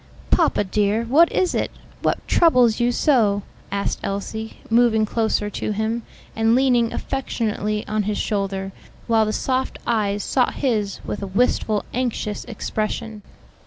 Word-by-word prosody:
"Papa, - - +3
dear, 205 +3 +1
what 295 +9 +4
is 365 -2 +1
it? - - 0 0.3
What - - -1
troubles 250 -9 +4
you 240 0 +2
so?" 220 -8 +2 0.3
asked 200 0 -1
Elsie, 220 +3 -4
moving 230 -2 +4
closer 220 -1 0
to 215 - -2
him, 220 +3 -1 0.3
and 225 +1 +3
leaning 245 -3 +3
affectionately 215 -5 -2
on 215 0 0
his 210 - -1
shoulder, 195 -2 -2 0.3
while 225 -2 +3
the - - 0
soft 260 +3 -1
eyes 205 -3 0
sought 250 -2 +1
his 215 -8 -1
with - - -4
a 200 - -3
wistful, 210 0 +1
anxious 235 -4 -2
expression. 220 -1 -4
220 Hz, 140 wpm, -22 LUFS, 210-240 Hz, 0.3 s, what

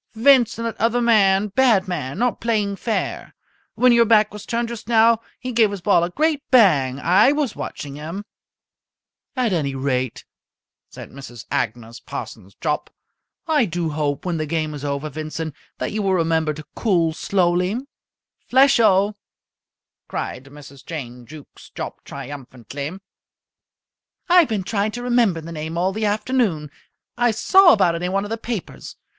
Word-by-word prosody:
"Vincent, 235 -1 +4
that 230 -1 -4
other 235 +2 +2
man 210 -4 +3
bad 215 -3 +3
man 150 -5 -4
not 245 +2 0
playing 210 -4 0
fair. 220 +2 -3 0.4
When 250 0 +4
your 235 0 +6
back 215 -2 +3
was 210 -1 -9
turned 235 0 -1
just 235 -2 -8
now, 230 -1 +4 0.2
he 255 0 -5
gave 225 -3 +3
his 200 -2 -6
ball 185 -2 +3
a 175 - -1
great 305 - 0
bang. 145 - +4
I 190 - +4
was 290 -6 -1
watching 140 -1 -7
him." 165 +7 -6 1.1
"At 245 -6 0
any 140 -5 -1
rate," 130 -2 -2 0.6
said - - -11
Mrs. 120 -4 -10
Agnes 115 +1 -3
Parsons 95 +2 -8
Jopp, 150 -2 -2 0.6
"I 305 -6 +2
do 170 -3 -3
hope, 145 -1 -2
when 175 -2 -1
the 155 -1 -3
game 155 -1 -2
is 145 -1 -8
over, 140 +1 -3
Vincent, 155 +1 -5 0.2
that - - -3
you 215 - -2
will 195 -2 +1
remember 160 -3 0
to 155 - -9
cool 170 -7 +1
slowly." 180 +3 0 0.7
"Flesho!" 225 -6 +4 0.9
cried 130 - -5
Mrs. 140 -1 -14
Jane 125 -7 -8
Jukes 155 -2 -13
Jopp - - -6
triumphantly. 140 - -8 1.3
"I've 355 -4 +5
been 210 -4 -1
trying 210 +2 -1
to 245 - -5
remember 235 -9 +2
the 165 +1 -9
name 160 +1 -5
all 185 +2 0
the 215 +1 -1
afternoon. 205 - -1 0.5
I 240 0 +4
saw 375 - +5
about 185 -5 +3
it 170 - -4
in 180 +1 -2
one 195 +1 0
of 205 - -7
the 225 - -3
papers. 225 -5 -6
190 Hz, 160 wpm, -21 LUFS, 155-230 Hz, 1.3 s, your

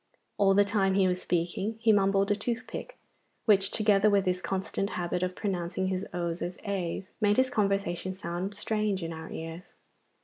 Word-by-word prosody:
All 195 -1 +5
the 205 0 +5
time 195 -2 +2
he 195 -1 +4
was 180 0 0
speaking 180 +5 -1
he 225 0 +4
mumbled 195 0 +3
a - - +4
toothpick, 230 +2 -4 0.5
which 195 -3 +4
together 210 -1 +3
with 200 -1 +3
his 180 0 0
constant 195 +1 -2
habit 175 0 -1
of 185 0 -1
pronouncing 185 -2 -2
his 190 +2 -2
o's 170 -1 -3
as 180 +1 -3
a's 190 -1 -3
made 210 -1 +3
his 260 0 +3
conversation 195 -3 0
sound 185 +2 -4
strange 210 -2 -1
to 165 0 -4
our 160 0 -7
ears. 165 +3 -7
195 Hz, 175 wpm, -29 LUFS, 180-205 Hz, 0.5 s, All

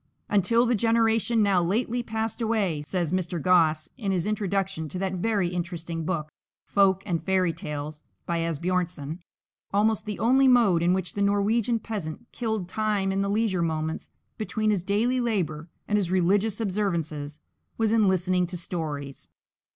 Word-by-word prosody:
"Until 230 +4 +3
the 245 - +2
generation 225 0 +2
now 195 -3 +3
lately 225 +7 0
passed 225 0 -3
away," 210 -9 0
says 170 +1 -2
Mr. 180 -2 -1
Gosse 160 -2 +3
in 200 -4 -1
his 180 -3 0
introduction 195 -5 -1
to 185 - -5
that 190 0 -2
very 195 -1 0
interesting 170 -2 -4
book, 155 -3 -2 0.3
"Folk 195 -1 +3
and 170 -4 -2
Fairy 185 -3 +1
Tales" 150 -1 -6 0.2
by 170 -1 -1
Asbjörnsen, 165 -1 -2 0.5
"almost 215 +1 +1
the 210 - -3
only 260 +5 +4
mode 230 -9 +5
in 175 +1 +3
which 185 -1 -2
the 200 - -3
Norwegian 205 +4 +2
peasant 210 -2 -5
killed 220 -6 -2
time 205 -1 0
in 195 +1 0
the 200 - 0
leisure 205 -3 +1
moments 160 -1 -2 0.3
between 215 0 0
his 200 -4 +1
daily 225 +7 +1
labour 175 - -1 0.2
and 210 0 +2
his 185 -4 -1
religious 195 +4 +2
observances, 165 -8 -2 0.4
was 225 -1 +1
in 220 -3 +4
listening 185 -1 +2
to 180 +1 -4
stories. 150 -5 -5
190 Hz, 160 wpm, -26 LUFS, 170-215 Hz, 0.5 s, mode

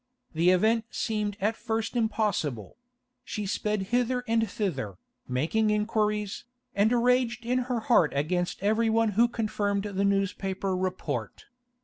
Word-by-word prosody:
The 165 +3 +3
event 220 +5 +3
seemed 210 -3 -2
at 215 +3 +1
first 225 0 -3
impossible; 210 - -1 0.5
she 210 - -4
sped 210 +1 -1
hither 250 0 +1
and 225 -1 +1
thither, 135 - -3 0.3
making 160 +13 +1
inquiries, 210 -1 0 0.3
and 205 +3 +3
raged 245 -1 +2
in 250 +2 +1
her 240 -2 0
heart 215 - +4
against 175 +6 -1
everyone 225 +1 +2
who 225 +4 +4
confirmed 210 -3 -1
the 200 -1 -2
newspaper 195 -1 0
report. 180 - -3
210 Hz, 125 wpm, -28 LUFS, 190-225 Hz, 0.5 s, heart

